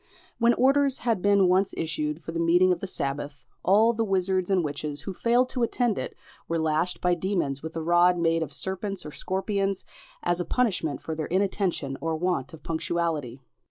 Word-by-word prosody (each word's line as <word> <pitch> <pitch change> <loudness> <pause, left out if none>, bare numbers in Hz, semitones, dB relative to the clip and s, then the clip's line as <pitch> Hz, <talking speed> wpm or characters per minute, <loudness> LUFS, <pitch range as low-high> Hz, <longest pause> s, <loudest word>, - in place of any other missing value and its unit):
When 235 0 +4
orders 275 +1 +3
had 230 -6 0
been 200 -1 +4
once 185 +2 +2
issued 155 -1 -2
for 165 - -5
the 165 - -3
meeting 175 +2 +4
of 180 - 0
the 195 - -5
sabbath, 140 -3 -3 0.3
all 215 +5 +4
the 225 0 0
wizards 190 -2 +1
and 190 -3 +3
witches 145 -1 -4
who 190 +5 -5
failed 240 +6 +2
to 250 - -3
attend 235 -1 +1
it - - -6 0.3
were 165 - 0
lashed 160 +2 0
by 180 0 +3
demons 175 -6 -1
with 160 +1 -7
a 165 - -3
rod 175 +2 +4
made 165 -1 +2
of 155 -3 -3
serpents 190 +1 -4
or 150 - -6
scorpions, 195 +3 -2 0.4
as 175 0 +1
a - - 0
punishment 180 - 0
for 160 - -4
their 155 -1 -3
inattention 185 -7 -1
or 165 0 -1
want 170 -5 -1
of 160 - -13
punctuality. 160 -6 -2
180 Hz, 195 wpm, -26 LUFS, 160-195 Hz, 0.4 s, When